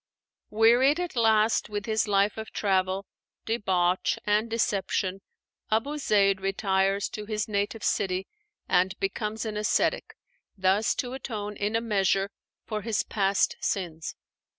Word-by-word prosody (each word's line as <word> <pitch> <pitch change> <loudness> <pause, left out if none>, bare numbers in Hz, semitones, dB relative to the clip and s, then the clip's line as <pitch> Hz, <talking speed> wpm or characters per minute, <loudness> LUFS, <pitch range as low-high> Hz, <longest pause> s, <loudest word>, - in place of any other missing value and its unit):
Wearied 240 +8 +4
at 355 -4 -3
last 220 -1 +3
with 205 -1 -4
his 220 -1 0
life 200 0 +2
of 220 0 -7
travel, 190 -1 0 0.4
debauch, 185 -5 +1
and 210 +2 +2
deception, 195 -3 -1 0.5
Abu 275 +8 0
Zeid 195 -6 +3
retires 195 0 +1
to 210 -1 -7
his 215 -1 -2
native 205 +1 -2
city 190 -1 0 0.4
and 185 +1 +2
becomes 210 +3 -2
an 215 -1 -3
ascetic, 210 +1 0 0.4
thus 190 +3 +2
to 245 0 -3
atone 210 -6 -5
in 205 +2 -1
a 225 - +2
measure 195 -2 +1 0.3
for 215 -2 -3
his 220 -2 0
past 195 -2 +1
sins. 165 -5 -3
210 Hz, 130 wpm, -27 LUFS, 195-220 Hz, 0.5 s, Wearied